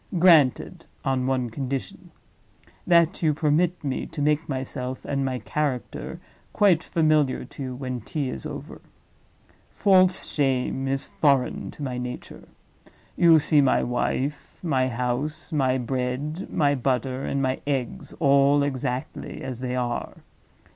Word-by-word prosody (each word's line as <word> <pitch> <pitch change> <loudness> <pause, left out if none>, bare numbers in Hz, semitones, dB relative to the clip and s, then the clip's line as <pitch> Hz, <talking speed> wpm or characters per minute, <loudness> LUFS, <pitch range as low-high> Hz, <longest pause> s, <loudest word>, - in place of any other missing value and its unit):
Granted, 165 -7 +4 0.2
on 130 -1 0
one 130 -3 0
condition—that 150 - -2
you 155 -3 +2
permit 160 +4 +1
me 135 -2 -2
to 155 - -8
make 150 +2 +1
myself 130 -1 -4
and 140 -1 -1
my 130 -1 -1
character 125 +3 -3 0.3
quite 195 -6 +4
familiar 155 -7 +1
to 135 - -11
you 130 -2 -4
when 130 -2 -4
tea 140 +5 -3
is 65 - -7
over. - - -8 0.9
False 185 -2 +3
shame 135 -1 0
is 135 +1 -1
foreign 140 -4 +1
to 150 - -8
my 125 -2 -3
nature. 125 0 -7 0.7
You 165 -2 +6
see 150 0 +4
my 135 - +3
wife, 130 +6 -2
my 135 -6 +1
house, 130 +7 -3
my 130 -3 +2
bread, 130 +7 -3
my 145 -2 +2
butter, 130 0 -1
and 140 - -1
my 130 -1 -1
eggs, 135 -4 -2
all 140 -1 +4
exactly 130 -2 -4
as 130 -3 -5
they 125 0 -3
are. 120 -1 -3
135 Hz, 135 wpm, -25 LUFS, 130-150 Hz, 0.9 s, You